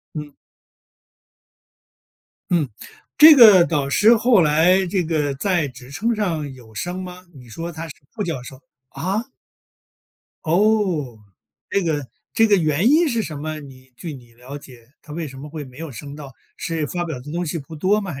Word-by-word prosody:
嗯。 150 -1 -6 2.2
嗯。 165 -6 +2 0.5
这 310 +1 +10
个 210 -8 +9
导 145 -4 -1
师 215 +11 +5
后 230 -2 +4
来 170 +5 +4
这 180 0 -1
个 150 -4 -1
在 170 0 0
职 125 0 -13
称 225 +11 -1
上 165 -9 -2
有 115 -4 -16
升 175 - -4
吗？ 180 0 -9
你 125 -3 -14
说 165 +9 -6
她 165 0 -7
是 155 - -10 0.2
副 220 - -4
教 160 -9 -4
授， 130 +1 -11 0.3
啊？ 195 - -2 1.2
哦， 175 - +1 0.5
这 200 - 0
个 150 -5 -2 0.3
这 225 -1 +4
个 205 - +4
原 160 +3 +2
因 320 +5 +4
是 230 -4 0
什 155 -6 -6
么？ 155 +1 -5
你 130 -2 -14
据 155 +5 -7
你 120 -3 -15
了 125 +4 -10
解， 125 -5 -14
她 150 - -12
为 160 -1 -4
什 135 0 -12
么 150 +2 -9
会 155 -1 -6
没 130 -2 -15
有 160 -3 -7
升 140 +5 -9
到， 140 -3 -10 0.2
是 160 -3 -3
发 175 +2 -3
表 155 -7 -5
的 145 +4 -10
东 175 +3 -2
西 165 +1 -3
不 155 +3 -10
多 195 +7 +2
吗？ 195 -3 -5
还 135 - -8
160 Hz, 195 characters per minute, -21 LUFS, 140-185 Hz, 2.2 s, 这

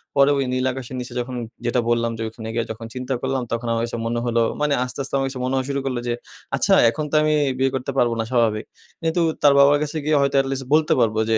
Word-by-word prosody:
পরে 140 +1 +5
ওই 135 - 0
নীল 130 0 0
আকাশের 130 0 -7
নিচে 125 - -7
যখন 125 +1 -4 0.3
যেটা 120 +1 +1
বললাম 115 0 +1
যে, - - -6
ওখানে 110 0 -8
গিয়ে 115 -1 0
যখন 110 +1 -7
চিন্তা 130 +1 -3
করলাম, 130 -1 -1
তখন 115 +1 -2
আমার 115 0 0 0.2
মনে 120 +1 -1
হলো 115 -1 +1 0.2
মানি 150 -1 +2
আস্তে, 125 +1 -6
আস্তে 135 - -9
আমার 135 - 0
কাছে 130 -1 -6
মনে 130 - -1
হওয়া 130 -1 0
শুরু 140 0 -1
করলো 125 -2 -1
যে, 120 - +1 0.4
আচ্ছা - - +2 0.2
এখন 150 +6 -3
তো - - 0
আমি 155 0 +2 0.2
বিয়ে 135 0 +2
করতে 130 +1 -3
পারবো 120 -2 +3
না, - - +1
স্বাভাবিক। 115 -3 +1 0.4
কিন্তু 165 +2 +1 0.2
তার 145 -1 +6
বাবার 140 +1 +6
কাছে 150 +2 -4
গিয়ে 155 -1 +3
হয়তো 140 0 +1
এটলিস্ট 135 -1 -4
বলতে 155 0 +4
পারবো 110 -1 +2
যে, 110 - +4
130 Hz, 250 wpm, -22 LUFS, 120-140 Hz, 0.4 s, তার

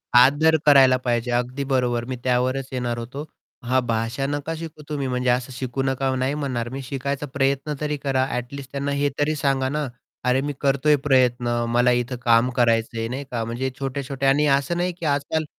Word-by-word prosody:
आदर 145 +6 +6
करायला 135 -3 +7
पाहिजे, 120 0 0
अगदी 125 +3 -1
बरोबर. 120 -2 +1
मी 130 - -4
त्यावरच 130 +1 0
येणार 120 -2 -2
होतो. 130 +6 -6 0.4
हां, 130 +2 +2
भाषा 115 +4 -1
नका 145 +3 -3
शिकू 160 -1 -8
तुम्ही 140 -3 -2
म्हणजे 125 0 0
असं 125 +1 0
शिकू 130 +1 -3
नका 135 0 0
नाही 130 +2 0
म्हणणार. 125 -5 -3
मी 135 +2 -5
शिकायचा 140 +2 -3
प्रयत्न 140 +2 0
तरी 150 -1 -1
करा 135 -2 0
ॲटलिस्ट 130 +2 -5
त्यांना 140 0 -2
हे 145 - +2
तरी 155 +1 +1
सांगा 135 -2 0
ना. 150 0 -2 0.4
अरे, 125 +1 +2
मी 145 +1 -3
करतोय 140 +2 +3
प्रयत्न 125 -3 +3 0.2
मला 120 +1 +3
इथं 125 +1 0
काम 115 +1 +4
करायचंय 115 -1 +1
नाही 130 +4 -4
का 115 -2 -1
म्हणजे 120 +3 -2
छोटे-छोटे 135 0 -3
आणि 140 +2 +4
असं 140 +5 -2
नाही 180 +1 0
की 170 - -5
आजकाल 145 +2 0
130 Hz, 185 wpm, -23 LUFS, 125-140 Hz, 0.4 s, करायला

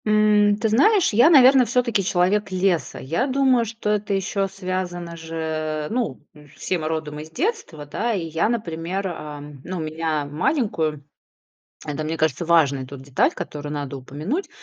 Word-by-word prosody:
М, 210 -1 +4
ты 220 +1 0
знаешь, 330 - +4
я, 240 +9 +6
наверно, 265 -4 +7
всё-таки 235 -5 +1
человек 195 +3 +1
леса. 185 -2 0
Я 165 - -1
думаю, 260 -3 +3
что 220 -1 -3
это 210 -1 -1
ещё 195 +1 -1
связано 185 -3 -4
же, 160 -2 -3
ну, 230 - -2
э, 150 -1 -16
все 155 +4 -3
мы 155 - -3
родом 155 -2 -3
из 155 +1 -8
детства. 300 - -3
Да, 225 +11 -2
и 190 -5 -2
я, 165 +5 0
например, 190 -3 -2
а, 150 -4 -6 0.2
ну, 185 0 -5
меня 155 -1 -2
маленькую, 160 - -1 0.8
это, 150 0 -3
мне 160 +1 -2
кажется, 160 +1 0
важная 140 -6 +3
тут 135 0 -10
деталь, 135 -1 +1
которую 150 0 -6
надо 145 -2 -4
упомянуть. 155 - -4
175 Hz, 160 wpm, -23 LUFS, 155-215 Hz, 0.8 s, наверно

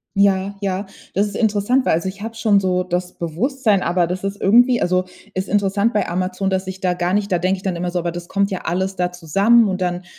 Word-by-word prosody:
Ja. 200 - +3
Ja, 195 0 +2
ja. 195 0 -2 0.3
Das 200 +2 +2
ist 205 - -8
interessant, 220 +4 +1
weil - - +3
also 170 +4 0
ich 200 +2 -10
hab 225 +1 -6
schon 215 -3 +3
so 180 -1 0
das 180 0 -3
Bewusstsein, 210 - 0
aber 175 0 +1
das 180 +2 -4
ist 195 +1 -4
irgendwie 240 +4 +4
also 185 +1 +1 0.3
ist 190 +1 -3
interessant 205 +3 +1
bei 210 - 0
Amazon, 185 +2 -1
dass 190 0 -1
ich 190 0 -6
da 180 -1 +1
gar 175 0 -1
nicht 205 0 0
da 180 - +2
denke 185 +2 +1
ich 185 - -13
dann 190 -2 -1
immer 175 +1 -2
so: 175 - -1
„Aber 170 0 -2
das 175 0 -7
kommt 200 +2 0
ja 185 - -3
alles 190 +3 -1
da 180 0 0
zusammen.“ 200 +7 +3
und 185 0 -2
dann, 180 0 -1
190 Hz, 255 wpm, -20 LUFS, 180-205 Hz, 0.3 s, irgendwie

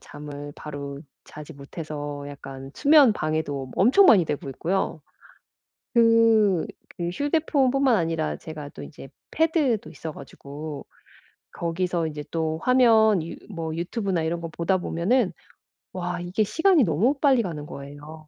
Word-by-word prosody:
잠을 145 0 -9
바로 140 -2 -7 0.2
자지 150 +1 -11
못해서 145 0 -7
약간 135 -1 -9
수면 290 -5 +6
방해도 155 -6 -3
엄청 320 - +6
많이 185 -6 +6
되고 145 -2 -4
있고요. 170 +3 -2 0.9
그 230 -5 +4 0.3
그 170 - -1
휴대폰뿐만 275 - +2
아니라 165 -4 -1
제가 150 -3 -8
또 - - -11
인제 135 -3 -11 0.2
패드도 305 - +1
있어 160 - -7
가지고 145 0 -9 0.7
거기서 170 0 -1
인제 150 -1 -5
또 160 -1 -2
화면 220 -7 +4
유 170 - -7
뭐 165 -4 -4
유튜브나 180 +1 -2
이런 170 +1 -2
거 165 - -4
보다 170 +3 0
보면은 185 +6 0 0.6
와 180 -1 -3
이게 180 +5 -1
시간이 320 - +3
너무 200 - +2
빨리 270 -5 +4
가는 155 -6 -5
거예요. 150 +2 -10
170 Hz, 280 characters per minute, -25 LUFS, 150-225 Hz, 0.9 s, 수면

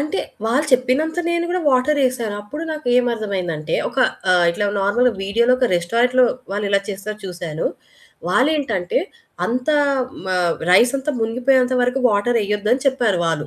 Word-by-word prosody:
అంటె 305 +7 -2 0.2
వాళ్ళు 240 +6 +2
చెప్పినంత 260 +6 +1
నేను 340 0 0
గూడా 360 +1 -1
వాటరేసాను. 255 -4 +1
అప్పుడు 295 +10 -7
నాకు 310 -2 -6
ఏమర్థమయిందంటే 200 -10 -1
ఒక - - -7 0.3
ఆహ్, 180 -1 +4
ఇట్లా 205 +4 -2
నార్మల్‌గా 240 +5 +2
వీడియోలో 235 +5 +2
ఒక 255 - +2
రెస్టారెంట్‌లో 240 +8 +2 0.3
వాళ్ళెలా 200 -1 0
చేస్తారో 205 +1 -5
చూశాను. 175 -4 -4 0.6
వాళ్ళేంటంటే 235 - +1 0.5
అంత 250 +3 -3 0.6
మ - - -6 0.4
రైస్ 235 +7 +5
అంతా 270 +2 -2
మునిగిపోయేంత 250 +3 +2
వరకు 250 +2 0
వాటరెయొద్దు 210 -1 0
అని 255 +1 0
చెప్పారు 240 -8 +1
వాళ్ళు. 160 -2 -1
235 Hz, 135 wpm, -20 LUFS, 200-255 Hz, 0.6 s, రైస్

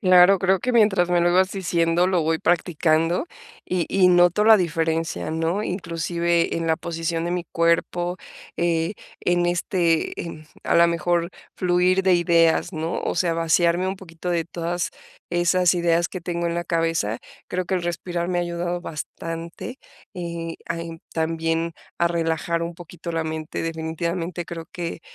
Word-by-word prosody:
Claro, 185 0 +6
creo 190 0 +2
que 250 - -1
mientras 200 -6 +4
me 175 - +3
lo 175 0 +3
ibas 185 +1 +3
diciendo, 170 -2 +1
lo 185 -3 +2
voy 160 +1 +1
practicando, 165 - +1 0.4
y 180 -2 0
y 190 -1 +4
noto 175 +3 +5
la 220 0 +8
diferencia, 165 - -1
¿no?, 165 +6 0
inclusive, 170 -2 0
en 165 0 -2
la 160 - +3
posición 165 0 -3
de 175 - -1
mi 180 -1 -1
cuerpo, 170 +1 +1 0.4
eh, 170 +1 +1 0.3
en 175 0 +1
este, 175 -1 +1
eh, - - -5
en 155 -2 -9 0.2
a - - +2
la 170 0 +7
mejor, 170 0 0 0.3
fluir 180 +1 +2
de 190 -1 +5
ideas, 170 0 +3
¿no?, 160 +1 -2
o - - -2
sea, 170 -1 +1
vaciarme 170 +2 +2
un 190 - -3
poquito 180 -1 -7
de 170 -2 +1
todas 170 +1 -3 0.4
esas 175 +1 +3
ideas 170 -1 +2
que 185 - -6
tengo 170 0 -2
en 170 - -1
la 175 - -1
cabeza, 165 -11 0 0.3
creo 185 0 -2
que 190 +2 -1
el 180 - -1
respirar 175 0 -3
me 180 -1 0
ha - - +2
ayudado 175 0 -2
bastante, 165 - -6 0.4
eh, 170 -2 -5
a, 165 0 -2
en 165 -1 -7
también 165 +1 -1 0.3
a 170 - +3
relajar 170 0 -1
un 170 0 -4
poquito 170 0 -8
la 165 -1 -1
mente, 160 0 -4
definitivamente 165 +2 -3
creo 165 0 -7
que, 170 -1 -5
170 Hz, 170 wpm, -23 LUFS, 165-180 Hz, 0.4 s, la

